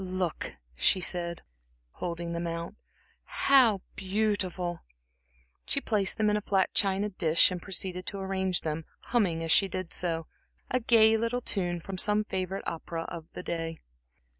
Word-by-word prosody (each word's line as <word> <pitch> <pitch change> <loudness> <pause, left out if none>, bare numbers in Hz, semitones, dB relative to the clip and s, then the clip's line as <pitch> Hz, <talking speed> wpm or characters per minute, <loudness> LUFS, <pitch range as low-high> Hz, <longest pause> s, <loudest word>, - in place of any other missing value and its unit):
"Look," 185 -2 -3 0.2
she 185 - +3
said, 170 -1 -1 0.5
holding 170 - -4
them 170 0 -2
out 170 +2 -4 0.5
"how 245 -8 +4
beautiful!" 190 -3 -1 0.9
She 280 - +1
placed 210 -7 +1
them 215 - +2
in - - +2
a - - -2
flat 195 -2 +1
china 200 +1 +2
dish 170 -3 +3
and 180 -1 -4
proceeded 185 -1 -3
to 200 - -3
arrange 190 -1 0
them, 155 0 -3 0.3
humming, 180 -9 +2
as 165 - -2
she 195 - +5
did 185 -2 -4
so, 165 -2 0 0.5
a 255 - +2
gay 225 -2 +5
little 230 +2 -1
tune 175 -6 -1
from 190 +1 -3
some 210 +2 +5
favorite 190 -1 -3
opera 165 0 -4
of 165 -2 -7
the - - -7
day. 165 -1 -3
185 Hz, 155 wpm, -29 LUFS, 170-205 Hz, 0.9 s, she